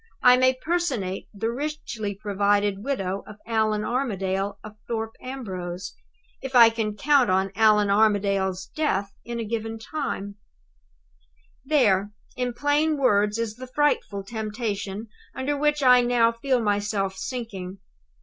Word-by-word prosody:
_I 250 Hz, 0 st, +7 dB
may 255 Hz, 0 st, +4 dB
personate 255 Hz, -, -2 dB
the 225 Hz, +3 st, -2 dB
richly 240 Hz, -7 st, -4 dB
provided 205 Hz, 0 st, 0 dB
widow 200 Hz, -8 st, -2 dB
of 210 Hz, -, -10 dB
Allan 220 Hz, -2 st, +1 dB
Armadale 200 Hz, -6 st, -1 dB
of 215 Hz, -1 st, -10 dB
Thorpe 225 Hz, -1 st, -3 dB
Ambrose, 185 Hz, -9 st, -6 dB, 0.5 s
if 265 Hz, -1 st, -6 dB
I 230 Hz, -2 st, +9 dB
can 220 Hz, -2 st, -2 dB
count 275 Hz, -1 st, +4 dB
on 190 Hz, +1 st, +1 dB
Allan 210 Hz, -1 st, +4 dB
Armadale's 200 Hz, -3 st, +2 dB
death 200 Hz, -11 st, 0 dB
in 235 Hz, 0 st, -5 dB
a -, -, -2 dB
given 225 Hz, 0 st, -3 dB
time_. 220 Hz, -5 st, -4 dB, 1.3 s
"There, 210 Hz, -9 st, +2 dB, 0.2 s
in 250 Hz, -1 st, -2 dB
plain 295 Hz, +3 st, +1 dB
words, 210 Hz, -5 st, +2 dB
is 230 Hz, -1 st, -3 dB
the 255 Hz, +1 st, -8 dB
frightful 255 Hz, -7 st, 0 dB
temptation 215 Hz, -1 st, -4 dB, 0.3 s
under 280 Hz, +3 st, -1 dB
which 295 Hz, 0 st, +1 dB
I 250 Hz, -1 st, +7 dB
now 240 Hz, -1 st, +3 dB
feel 250 Hz, +2 st, 0 dB
myself 205 Hz, -2 st, 0 dB
sinking. 195 Hz, -5 st, -5 dB
220 Hz, 130 wpm, -25 LUFS, 200-255 Hz, 1.3 s, I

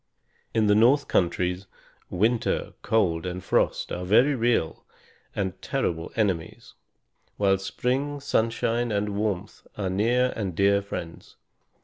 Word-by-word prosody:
In 110 Hz, -1 st, +3 dB
the 105 Hz, -, +4 dB
north 125 Hz, +7 st, +4 dB
countries, 90 Hz, +2 st, 0 dB, 0.4 s
winter, 110 Hz, +6 st, 0 dB
cold, 90 Hz, -6 st, +1 dB
and 90 Hz, +1 st, -5 dB
frost -, -, 0 dB
are 90 Hz, -, -3 dB
very 120 Hz, +10 st, +4 dB
real 120 Hz, -9 st, 0 dB, 0.5 s
and 95 Hz, -2 st, -3 dB
terrible 85 Hz, -12 st, -2 dB
enemies; 110 Hz, +3 st, -2 dB, 0.6 s
while 95 Hz, -1 st, +2 dB
spring, 135 Hz, +8 st, -2 dB
sunshine, 115 Hz, -2 st, 0 dB
and 105 Hz, 0 st, 0 dB
warmth 100 Hz, -1 st, -3 dB
are 95 Hz, -3 st, -2 dB
near 120 Hz, +6 st, +2 dB
and 95 Hz, -6 st, -3 dB
dear 100 Hz, +1 st, +3 dB
friends. 85 Hz, -4 st, -8 dB
105 Hz, 120 wpm, -26 LUFS, 95-120 Hz, 0.6 s, the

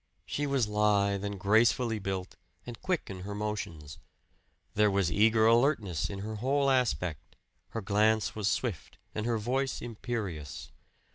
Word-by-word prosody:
She 145 Hz, 0 st, -2 dB
was 135 Hz, -5 st, +1 dB
lithe 105 Hz, -1 st, +2 dB
and 100 Hz, -1 st, -4 dB
gracefully 110 Hz, +3 st, +3 dB
built, 95 Hz, -2 st, -4 dB, 0.3 s
and 120 Hz, -2 st, -8 dB
quick 180 Hz, -3 st, -1 dB
in 95 Hz, -, -7 dB
her 100 Hz, +2 st, -6 dB
motions. 85 Hz, -8 st, -5 dB, 0.7 s
There 105 Hz, 0 st, +4 dB
was 95 Hz, -4 st, +1 dB
eager 110 Hz, +4 st, +4 dB
alertness 115 Hz, -, +2 dB
in 95 Hz, -1 st, -5 dB
her 110 Hz, +1 st, -5 dB
whole 135 Hz, +4 st, +2 dB
aspect; 90 Hz, -, -1 dB, 0.3 s
her 115 Hz, -, -5 dB
glance 105 Hz, 0 st, +2 dB
was 105 Hz, -2 st, -2 dB
swift 110 Hz, -, -2 dB, 0.2 s
and 110 Hz, +1 st, -2 dB
her 115 Hz, -1 st, +1 dB
voice 130 Hz, +5 st, -1 dB
imperious. 105 Hz, -, -5 dB
105 Hz, 145 wpm, -30 LUFS, 100-120 Hz, 0.7 s, There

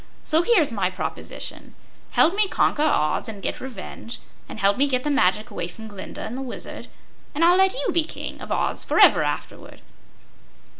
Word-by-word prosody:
So 315 Hz, +1 st, +2 dB
here's 345 Hz, -, +3 dB
my 195 Hz, -5 st, 0 dB
proposition: 185 Hz, -, -6 dB, 0.3 s
Help 340 Hz, -, +4 dB
me 420 Hz, 0 st, +3 dB
conquer 305 Hz, -, +1 dB
Oz 190 Hz, -, +1 dB
and 210 Hz, -2 st, -7 dB
get -, -, -4 dB
revenge, 235 Hz, -1 st, -7 dB, 0.3 s
and -, -, -8 dB
help 200 Hz, 0 st, +3 dB
me 280 Hz, +2 st, +2 dB
get 255 Hz, -2 st, 0 dB
the 295 Hz, -, 0 dB
magic 210 Hz, -4 st, +2 dB
away 170 Hz, -, -4 dB
from 220 Hz, +5 st, -10 dB
Glinda 200 Hz, -3 st, -8 dB
and 230 Hz, -, -5 dB
the 265 Hz, -, -4 dB
Wizard, 260 Hz, -2 st, -7 dB, 0.5 s
and 325 Hz, +3 st, +3 dB
I'll 350 Hz, +1 st, +6 dB
let 380 Hz, +2 st, +4 dB
you -, -, 0 dB
be 335 Hz, -, +4 dB
King 310 Hz, -, -7 dB
of -, -, -8 dB
Oz -, -, 0 dB
forever -, -, +6 dB
afterward." -, -, -4 dB
260 Hz, 185 wpm, -24 LUFS, 200-330 Hz, 0.5 s, I'll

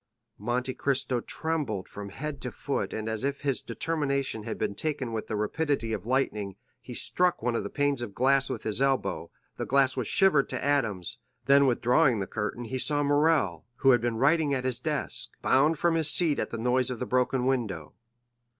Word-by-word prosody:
Monte 125 Hz, +4 st, -1 dB
Cristo 130 Hz, -2 st, 0 dB
trembled 145 Hz, -, -2 dB
from 100 Hz, 0 st, -8 dB
head 145 Hz, +7 st, -6 dB
to 125 Hz, -, -4 dB
foot 140 Hz, +5 st, -3 dB
and 110 Hz, 0 st, -4 dB
as 110 Hz, +1 st, -3 dB
if 140 Hz, 0 st, -2 dB
his 140 Hz, -3 st, 0 dB
determination 140 Hz, -4 st, -2 dB
had -, -, -4 dB
been -, -, -1 dB
taken 135 Hz, -2 st, -3 dB
with 110 Hz, -, -3 dB
the 110 Hz, -, -3 dB
rapidity 115 Hz, +1 st, -1 dB
of 105 Hz, 0 st, -5 dB
lightning, 105 Hz, -7 st, 0 dB, 0.3 s
he -, -, -9 dB
struck 180 Hz, -1 st, +1 dB
one 120 Hz, -1 st, 0 dB
of -, -, 0 dB
the 100 Hz, -, -5 dB
panes 145 Hz, -3 st, 0 dB
of 110 Hz, -5 st, -6 dB
glass 135 Hz, +2 st, +3 dB
with -, -, -4 dB
his 110 Hz, +3 st, -1 dB
elbow; 135 Hz, -1 st, 0 dB, 0.3 s
the -, -, -3 dB
glass 135 Hz, -1 st, +3 dB
was 125 Hz, -5 st, -2 dB
shivered 185 Hz, -8 st, +3 dB
to 125 Hz, 0 st, -4 dB
atoms, 115 Hz, -7 st, 0 dB, 0.3 s
then 140 Hz, 0 st, +6 dB
withdrawing 125 Hz, +1 st, +3 dB
the 95 Hz, -, -2 dB
curtain 105 Hz, +4 st, -4 dB
he 130 Hz, +3 st, -4 dB
saw 145 Hz, +2 st, +1 dB
Morrel, 145 Hz, -, +2 dB
who 135 Hz, +2 st, +4 dB
had 120 Hz, -2 st, +4 dB
been 120 Hz, -1 st, -1 dB
writing 145 Hz, +2 st, +3 dB
at 130 Hz, -1 st, -3 dB
his 125 Hz, -2 st, 0 dB
desk, 150 Hz, +1 st, -2 dB
bound 150 Hz, +4 st, +3 dB
from 170 Hz, +3 st, +2 dB
his 160 Hz, -2 st, +3 dB
seat 155 Hz, -3 st, +3 dB
at -, -, -2 dB
the 115 Hz, -, -5 dB
noise 125 Hz, +2 st, +1 dB
of 125 Hz, -, -3 dB
the 125 Hz, -, -3 dB
broken 125 Hz, 0 st, +1 dB
window. 110 Hz, -, -1 dB
130 Hz, 200 wpm, -28 LUFS, 115-145 Hz, 0.3 s, then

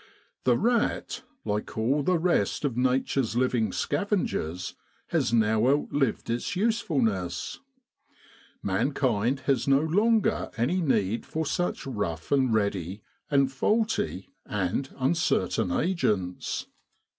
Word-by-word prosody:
The 125 Hz, -2 st, +4 dB
rat, 235 Hz, +1 st, 0 dB, 0.2 s
like 105 Hz, 0 st, -3 dB
all 130 Hz, +7 st, +2 dB
the 180 Hz, +5 st, +2 dB
rest 170 Hz, -2 st, +1 dB
of 130 Hz, -5 st, -1 dB
Nature's 130 Hz, -1 st, +1 dB
living 125 Hz, -3 st, +1 dB
scavengers, 145 Hz, -, -1 dB, 0.4 s
has -, -, +1 dB
now 110 Hz, 0 st, +3 dB
outlived 140 Hz, -3 st, +1 dB
its 120 Hz, +11 st, -2 dB
usefulness. 135 Hz, -, 0 dB, 1.0 s
Mankind 125 Hz, +4 st, +1 dB
has 135 Hz, -2 st, 0 dB
no 135 Hz, +1 st, +5 dB
longer 210 Hz, +8 st, +2 dB
any 150 Hz, +11 st, +1 dB
need 115 Hz, -, +1 dB
for 160 Hz, 0 st, -3 dB
such 175 Hz, +4 st, -1 dB
rough 100 Hz, -10 st, -4 dB
and 135 Hz, -3 st, +3 dB
ready, 100 Hz, -2 st, -1 dB, 0.3 s
and 140 Hz, -2 st, +3 dB
faulty, 210 Hz, -, 0 dB
and 105 Hz, +7 st, -2 dB
uncertain 130 Hz, -, +1 dB
agents. 105 Hz, -, -1 dB
130 Hz, 110 wpm, -27 LUFS, 105-160 Hz, 1.0 s, no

